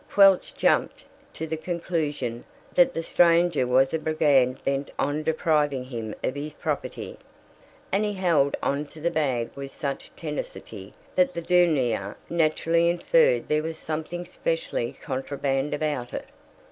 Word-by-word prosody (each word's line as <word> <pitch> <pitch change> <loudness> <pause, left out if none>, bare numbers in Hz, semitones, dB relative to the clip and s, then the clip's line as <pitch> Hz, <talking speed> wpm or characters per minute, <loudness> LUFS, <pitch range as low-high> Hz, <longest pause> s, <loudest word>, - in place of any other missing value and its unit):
Quelch 195 -2 +5
jumped - - +1 0.3
to 160 - -5
the 160 0 -3
conclusion 155 -8 -3 0.3
that 265 0 +4
the 165 - -2
stranger 170 -5 +3
was 130 +3 +3
a 160 - +1
brigand 145 -5 +3
bent 140 +1 -1
on 145 +2 0
depriving 150 -4 +1
him 115 -4 -6
of - - 0
his 145 +1 -5
property, - - -4 0.7
and 195 +2 +2
he 210 -1 -1
held 165 -8 +2
on 145 +1 0
to 155 - -13
the 170 +3 0
bag 135 -7 0
with 140 0 -6
such 140 0 -5
tenacity - - -7 0.2
that 275 0 +3
the 170 - -2
douanier 145 - +2 0.2
naturally 165 +1 +2
inferred 485 - +3
there 150 0 +2
was 160 0 -5
something 160 +3 -4
specially - - -2
contraband 135 0 -2
about 145 -5 -2
it. - - -5
155 Hz, 145 wpm, -26 LUFS, 135-175 Hz, 0.7 s, Quelch